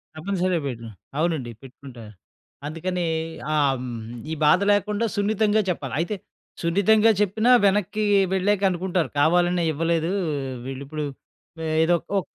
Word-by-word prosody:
తప్పనిసరిగా 180 +1 -1
పెట్టుదం. 115 -3 -7 0.3
అవునండి 155 -7 -1
పెట్టుకుంటా. 130 -2 -12 0.6
అందుకని 175 +3 -3 0.5
ఆ! - - +2 0.2
హ్మ్. 125 - -5 0.4
ఈ - - 0
బాధ 160 +5 +5
లేకుండా 210 +2 0
సున్నితంగా 210 +1 +2
చెప్పాలి. 140 -7 -4
అయితే 175 +5 -1 0.5
సున్నితంగా 205 +6 +4
చెప్పినా 215 +4 +2
వెనక్కి 205 +1 +1 0.3
వెళ్ళాక 190 +1 +1
అనుకుంటారు, 180 -1 -1
కావాలనే 175 +3 +3
ఇవ్వలేదు. 165 +2 0 0.5
వీళ్ళు 135 +1 -6
ఇప్పుడు, 155 +1 -4 0.8
ఏదో 175 +1 +3 0.2
ఒక - - -12
175 Hz, 115 wpm, -24 LUFS, 155-200 Hz, 0.8 s, బాధ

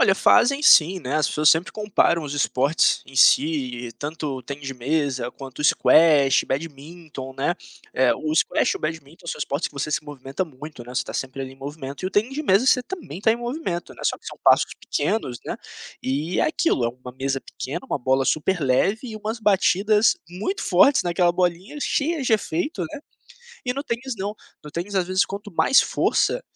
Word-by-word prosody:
Olha, - - +5
fazem 280 +4 +4
sim, 180 - +6
né, 135 0 -2
as 155 - +2
pessoas 150 0 +2
sempre 160 +4 +3
comparam 210 -5 +1
os 145 -2 -5
esportes 145 +1 +1
em 135 - -14
si 130 -3 +3
e - - -11
tanto 145 +2 -5
o 130 - -8
tênis 140 +2 -7
de - - -4
mesa 130 -1 -1
quanto 135 -2 -11
o 150 - -3
squash, 150 -4 +5
badminton, 145 -1 -6
né. 140 +6 0 0.4
Eh, 130 -1 +3
o 155 0 -3
squash 155 - +2
e - - -3
o - - -12
badminton 160 +1 -6
são - - -4
esportes 140 +4 -1
que - - -25
você 140 +2 -3
se 150 0 -1
movimenta 140 +3 -5
muito, 145 -4 -11
né, 125 - -10
você - - +1
está - - -8
sempre 135 0 -4
ali 130 - -7
em 135 - -17
movimento 140 +2 -7
e - - +1
o - - -3
tênis 220 +6 +1
de 300 +3 -4
mesa 195 0 +4
você 255 -1 +4
também 250 - -8
tá 220 +2 +4
em - - -2
movimento, 240 - -4
né, - - -14
só - - +1
que - - -29
são - - -8
passos - - +5
pequenos, 130 - -2
né, - - -4 0.4
e 150 +7 -2
é - - +3
aquilo, 310 - +1
é - - +2
uma 125 +1 -10
mesa 135 +1 -2
pequena, 140 - -7
uma 260 - -2
bola 130 +1 +1
super 170 +6 0
leve 145 - +2
e 220 - -6
umas 220 +2 -5
batidas 210 +1 +3
muito 210 - -3
fortes 195 +11 +4
naquela 175 0 +2
bolinha 180 - -1
cheia 305 +2 0
de 245 - 0
efeito, 290 - -1
né, - - -7 0.6
e 250 - 0
no 275 +2 -4
tênis 245 +1 -3
não, 200 +2 -4 0.3
no 150 - -10
tênis, 195 +4 -4
às 185 -2 +1
vezes, 185 +1 +2
quanto 205 +1 -8
mais 270 +10 +5
força, - - +1
160 Hz, 210 wpm, -23 LUFS, 135-205 Hz, 0.6 s, sim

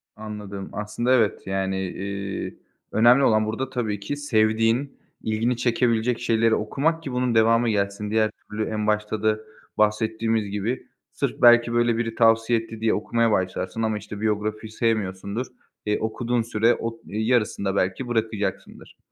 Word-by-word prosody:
Anladım, 105 -2 -7
aslında, 105 +4 -1
evet, 115 -5 +2
yani, 95 0 -1
eee, 100 +1 -5 0.4
önemli 120 +5 +5
olan 110 -3 +4
burada, 115 +5 -3
tabii 110 -6 -2
ki, 100 +8 -4
sevdiğin, 115 0 +1 0.3
ilgini 115 +3 0
çekebilecek 120 -1 +1
şeyleri 115 -1 +2
okumak 155 +9 -1
ki 135 - -5
bunun 125 -1 0
devamı 115 +1 +4
gelsin. 100 0 -1
Diğer 110 -1 +2
türlü, 110 +1 -5
en 105 -1 -2
başta 105 0 -1
da 110 0 +2 0.4
bahsettiğimiz 110 0 +1
gibi, 105 +5 -3 0.2
sırf - - -3
belki 120 0 +6
böyle 120 -1 +2
biri 115 -1 -2
tavsiye 115 0 +4
etti 115 0 -9
diye 110 -1 +2
okumaya 115 +2 +1
başlarsın 95 +2 -1
ama, 110 -1 0
işte, 105 0 -8
biyografiyi 110 0 -2
sevmiyorsundur. 110 0 -1 0.4
Eee, 105 0 0
okuduğun 120 +2 -1
süre 115 +1 +2
o - - -2
ııı, 115 - -19 0.2
yarısında 110 -3 +1
belki 95 +7 -1
bırakacaksındır. 110 -4 -3
110 Hz, 145 wpm, -24 LUFS, 105-120 Hz, 0.4 s, belki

